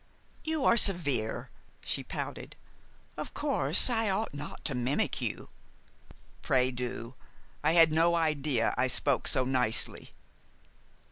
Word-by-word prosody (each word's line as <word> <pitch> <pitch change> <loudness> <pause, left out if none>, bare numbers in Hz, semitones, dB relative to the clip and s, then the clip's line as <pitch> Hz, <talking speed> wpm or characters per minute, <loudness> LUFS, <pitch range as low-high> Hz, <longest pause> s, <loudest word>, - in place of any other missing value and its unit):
"You 315 -3 -2
are 235 - +4
severe," 145 - +2 0.3
she - - -2
pouted. - - -7 0.6
"Of - - -7
course 140 +6 +3
I 225 -4 0
ought 195 0 -2
not 145 +1 -9
to 135 - 0
mimic 125 +3 -1
you - - -4 0.5
" - - -26
"Pray 130 -1 +1
do. 125 -1 -6 0.5
I 155 +2 +3
had 165 -2 +6
no 165 +2 +3
idea 150 -7 0
I 130 - +2
spoke 135 +1 0
so 130 - +2
nicely." 125 -3 -1
145 Hz, 130 wpm, -29 LUFS, 125-170 Hz, 0.6 s, had